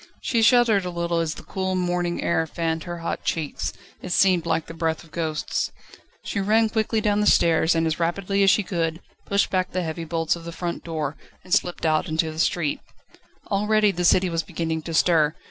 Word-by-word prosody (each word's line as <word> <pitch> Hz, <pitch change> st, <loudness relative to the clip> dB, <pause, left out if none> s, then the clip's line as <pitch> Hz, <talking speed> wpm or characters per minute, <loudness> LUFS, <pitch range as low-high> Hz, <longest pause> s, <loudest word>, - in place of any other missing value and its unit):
She 230 Hz, -3 st, 0 dB
shuddered 230 Hz, -4 st, +5 dB
a 180 Hz, -, -3 dB
little 170 Hz, -1 st, -1 dB
as 160 Hz, -2 st, -1 dB
the -, -, -10 dB
cool 190 Hz, -1 st, -2 dB
morning 175 Hz, -1 st, -1 dB
air 160 Hz, -1 st, +1 dB
fanned 160 Hz, 0 st, -2 dB
her 175 Hz, 0 st, -5 dB
hot 165 Hz, -, -3 dB
cheeks: 155 Hz, -3 st, -2 dB, 0.3 s
it 185 Hz, -, -7 dB
seemed 180 Hz, -2 st, +3 dB
like 165 Hz, -1 st, 0 dB
the -, -, -9 dB
breath 165 Hz, -1 st, -2 dB
of 165 Hz, -, -19 dB
ghosts. 160 Hz, -3 st, -2 dB, 0.5 s
She 200 Hz, -, -3 dB
ran 220 Hz, +3 st, +3 dB
quickly 220 Hz, 0 st, 0 dB
down 210 Hz, -1 st, +1 dB
the 210 Hz, -, +2 dB
stairs, 165 Hz, -2 st, +4 dB
and 165 Hz, 0 st, +1 dB
as 160 Hz, 0 st, -1 dB
rapidly 195 Hz, +4 st, 0 dB
as 195 Hz, -, +6 dB
she 210 Hz, -, +3 dB
could, 165 Hz, -3 st, -2 dB, 0.3 s
pushed 200 Hz, 0 st, +1 dB
back 185 Hz, -1 st, 0 dB
the 185 Hz, 0 st, -1 dB
heavy 165 Hz, 0 st, -4 dB
bolts 165 Hz, 0 st, 0 dB
of 170 Hz, -, -10 dB
the 170 Hz, -, -6 dB
front 170 Hz, +1 st, -4 dB
door, 155 Hz, -4 st, -3 dB, 0.3 s
and 185 Hz, -, -4 dB
slipped 175 Hz, -4 st, +1 dB
out 155 Hz, +3 st, +2 dB
into 160 Hz, 0 st, 0 dB
the 155 Hz, -, -8 dB
street. 160 Hz, -3 st, 0 dB, 0.7 s
Already 210 Hz, +1 st, +3 dB
the 175 Hz, -1 st, -3 dB
city 185 Hz, +2 st, +4 dB
was 165 Hz, 0 st, 0 dB
beginning 160 Hz, 0 st, -3 dB
to 165 Hz, +1 st, -6 dB
stir. 155 Hz, -3 st, +3 dB
170 Hz, 210 wpm, -24 LUFS, 160-190 Hz, 0.7 s, as